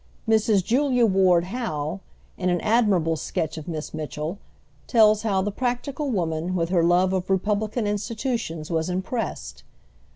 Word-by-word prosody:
Mrs. 220 -3 +3
Julia 250 0 +3
Ward 185 -4 +4
Howe, 180 -6 -3 0.4
in 185 -1 -1
an 175 -1 +1
admirable 205 -8 +2
sketch 160 0 -3
of 155 - -11
Miss 160 -3 -5
Mitchell, 155 +4 -4 0.5
tells 215 -3 +5
how 195 -4 +1
the 205 - -1
practical 260 +5 -2
woman, 170 -4 -1
with 165 -1 0
her 175 -2 +2
love 180 +2 +3
of 185 0 -2
republican 210 +4 0
institutions, 210 - -3
was 160 +1 0
impressed. 190 +6 -4
190 Hz, 140 wpm, -24 LUFS, 170-225 Hz, 0.5 s, tells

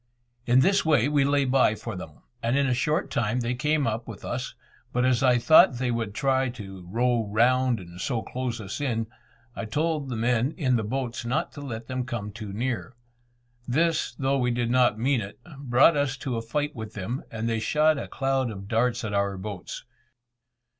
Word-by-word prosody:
In 125 +2 +5
this 195 +6 +3
way 150 -6 +3
we 145 -1 +3
lay 140 0 +2
by 130 -4 +3
for 110 0 -6
them, 80 -4 -10 0.2
and 120 +4 +1
in 140 - +3
a 130 - +2
short 150 +5 0
time 120 +2 0
they 120 +1 -1
came 150 +2 +1
up 115 +1 -2
with - - -9
us; - - -4 0.4
but 125 +1 +1
as 130 0 +2
I 125 -2 +5
thought 130 +1 +6
they 125 0 0
would 115 -3 -3
try 130 -1 +1
to 95 -7 -9
row 120 +1 +1
round 120 +3 +3
and 90 -1 -10
so 120 -1 -1
close 125 -2 -4
us 100 +6 -6
in, 115 -5 0 0.5
I - - -4
told 150 +4 -1
the 125 - -3
men 120 +4 +1
in 130 -7 +2
the 115 - 0
boats 120 +2 -3
not 125 +6 -1
to 145 - -9
let 115 -5 -6
them 130 +1 -3
come 120 -5 -5
too 105 -1 -7
near. 120 +3 -3 0.7
This, 155 -2 +1
though 135 +1 0
we 125 -1 +1
did 120 -1 0
not 125 -4 +3
mean 125 +1 +1
it, 100 0 -8 0.2
brought 135 +4 +4
us 145 -2 0
to 130 -2 -3
a 115 - -2
fight 145 +6 -2
with 110 -2 -7
them, 110 +6 -4
and 110 0 -3
they 115 -1 0
shot 150 +6 +2
a - - -5
cloud 135 -2 0
of 100 -2 -8
darts 120 +3 +1
at 105 -2 -3
our 100 -1 0
boats. 100 -1 -7
125 Hz, 205 wpm, -26 LUFS, 110-135 Hz, 0.7 s, thought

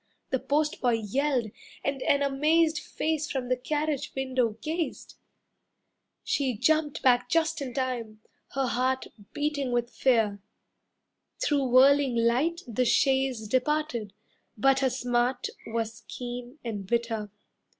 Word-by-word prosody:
The 260 - +1
postboy 290 -4 +1
yelled, 235 +1 0 0.3
and 275 -1 -2
an 280 +1 +2
amazed 310 +3 +2
Face 310 -1 -2
from 255 -2 -3
the 255 - +3
carriage 295 +2 -2
window 255 -4 0
gazed. 320 +4 -4 1.1
She 260 -5 0
jumped 300 +4 +1
back 245 -1 +4
just 320 0 +1
in 255 -3 -5
time, 240 -5 -3 0.4
her 270 -1 +1
heart 255 +2 0 0.3
Beating 290 -3 -1
with 240 0 0
fear. 220 -6 +2 1.0
Through 285 -2 +1
whirling 265 +1 +5
light 255 +9 +2
The 240 +2 0
chaise 265 -3 +2
departed, 255 -4 0 0.4
but 270 +4 +4
her 270 -1 +2
smart 245 0 0 0.2
Was 225 0 -3
keen 245 +1 -7
and 205 -5 -4
bitter. 230 -2 -1
260 Hz, 120 wpm, -28 LUFS, 240-285 Hz, 1.1 s, whirling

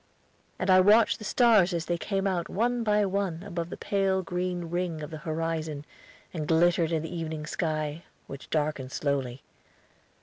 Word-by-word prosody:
I 185 0 +5
watched 210 +4 +5
the - - -9
stars 210 -6 +4
as 165 -1 -2
they 175 - 0
came 195 -1 -2
out 180 -3 -1
one 240 +3 0
by 210 -1 +2
one 190 -3 -2
above 170 -4 -4
the - - -7
pale 195 -1 0
green 180 -1 -2
ring 175 -3 -2
of 150 - -7
the 155 - -6
horizon 155 -2 -3 0.5
and 155 -4 -4
glittered 170 0 +3
in 160 -2 0
the 165 +2 -6
evening 160 -2 -4
sky, 155 -1 -2 0.2
which 140 0 -10
darkened 150 -4 -1
slowly. 135 -3 -2
170 Hz, 165 wpm, -28 LUFS, 155-195 Hz, 0.5 s, I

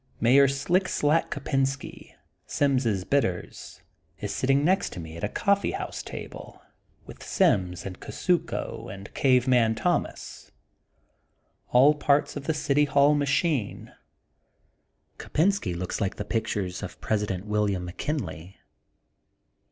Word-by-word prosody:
Mayor 135 +4 +6
Slick 170 +8 +1
Slack 150 +3 +1
Kopensky, 135 -1 -3 0.3
Sims' 125 -9 +1
Bitters,'* 95 -8 -2 0.4
is - - -4
sitting 135 +2 +2
next 190 +3 +2
to 90 - -7
me 80 -1 -8
at 85 - -9
a 105 - 0
coffee 200 0 +1
house - - -5
table - - -9 0.5
with - - -12
Sims 90 -1 +1
and 95 -2 -7
Kusuko 180 -3 -2
and 100 +1 -10
Cave 130 -2 +3
Man 115 -3 +3
Thomas, 110 - -2 1.2
all 135 +5 +6
parts 145 -1 +1
of 145 -1 -6
the 160 - +1
City 145 -1 +2
Hall 140 +1 +4
machine. 140 - -1 1.3
Kopensky 160 - 0
looks 90 +4 -4
like 100 - -1
the - - -5
pic 115 - -1
tures 95 -3 -3
of - - -8
President 105 -3 -2
William 105 -3 0
McKinley. 90 - -5
130 Hz, 125 wpm, -26 LUFS, 100-145 Hz, 1.3 s, Mayor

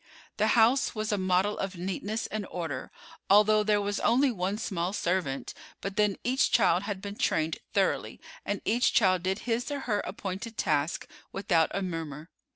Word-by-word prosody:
The 215 0 +2
house 240 +4 +4
was 215 0 -2
a 205 - +1
model 185 +2 +1
of 195 0 -3
neatness 195 +5 -3
and 215 -2 -4
order, 160 -7 -5 0.4
although 210 +2 +6
there 210 0 +2
was 205 0 -2
only 260 +3 +3
one 195 -1 -2
small 190 -4 -2
servant; 175 -9 -1 0.3
but 195 0 -5
then 210 -1 +2
each 255 +2 +2
child 185 -6 +4
had 200 -1 -5
been 200 0 -5
trained 155 0 0 0.2
thoroughly, - - 0 0.2
and 205 - -3
each 240 +3 +2
child 185 -4 +4
did 190 +3 -2
his 240 +2 -1
or 285 -1 -3
her 210 -5 0
appointed 195 +4 -5
task 150 +2 0 0.2
without 175 -5 +2
a 195 - -2
murmur. 165 -3 -5
200 Hz, 170 wpm, -28 LUFS, 180-215 Hz, 0.4 s, although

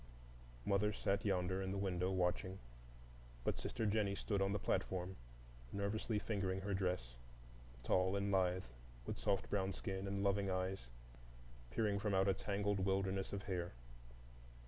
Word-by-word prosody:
Mother 100 +2 +3
sat 100 0 0
yonder 95 -1 +1
in 95 - -2
the 100 - -1
window 95 -2 +1
watching; 95 0 +1 0.9
but - - 0
sister 115 - -2
Jennie 105 -1 +2
stood 100 0 0
on 95 0 +3
the 105 - +2
platform, 95 -1 -1 0.6
nervously 105 +2 0
fingering 95 -3 -1
her 100 +1 -1
dress, 90 -10 0 0.7
tall 95 +1 +3
and 100 0 +1
lithe, 95 -1 +3 0.4
with - - -3
soft 100 -2 +1
brown 95 -1 +1
skin 95 +1 -3
and 100 0 -1
loving 100 0 +2
eyes 95 -6 -1 0.8
peering 100 - +1
from 100 -1 +1
out 95 +1 +4
a 95 - +5
tangled 100 +1 0
wilderness 95 0 +1
of 100 -1 -3
hair. 90 -5 -2
95 Hz, 145 wpm, -40 LUFS, 95-100 Hz, 0.9 s, a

